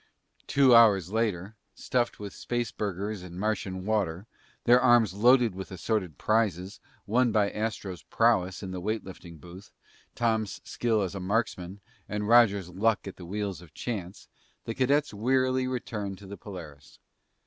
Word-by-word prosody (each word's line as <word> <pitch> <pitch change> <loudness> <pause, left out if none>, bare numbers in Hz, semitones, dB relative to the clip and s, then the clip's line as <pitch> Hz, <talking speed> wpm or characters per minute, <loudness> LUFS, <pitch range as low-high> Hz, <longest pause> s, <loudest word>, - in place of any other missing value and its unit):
Two 135 -3 +5
hours 100 -6 +6
later, 110 -3 -1 0.2
stuffed 120 -2 -1
with 100 -2 -7
spaceburgers 105 -4 -3
and 90 0 -9
Martian 95 -3 -2
water, 100 -4 -1 0.4
their 125 +1 +5
arms 120 -6 +4
loaded 120 +1 +4
with 95 +1 -7
assorted 95 -3 -2
prizes, 100 -3 0 0.3
won 120 +2 +2
by 105 -2 +2
Astro's 105 -4 -4
prowess 105 -5 +1
in 95 - -5
the 90 -1 -5
weight 110 +3 -2
lifting 90 -3 -11
booth, 90 +5 -13 0.4
Tom's 110 -4 0
skill 110 -4 0
as 95 - -4
a 100 - -5
marksman, 95 -1 -2 0.3
and 105 0 -2
Roger's 105 -6 +5
luck 105 +4 0
at 95 - -8
the 90 - -10
wheels 100 -2 -4
of 85 -3 -17
chance, 95 -5 -5 0.4
the 115 - -3
cadets 140 +2 +1
wearily 130 +4 +1
returned 105 -6 -4
to 100 - -13
the 100 +1 -8
Polaris. 80 -9 -11
105 Hz, 150 wpm, -28 LUFS, 95-115 Hz, 0.4 s, hours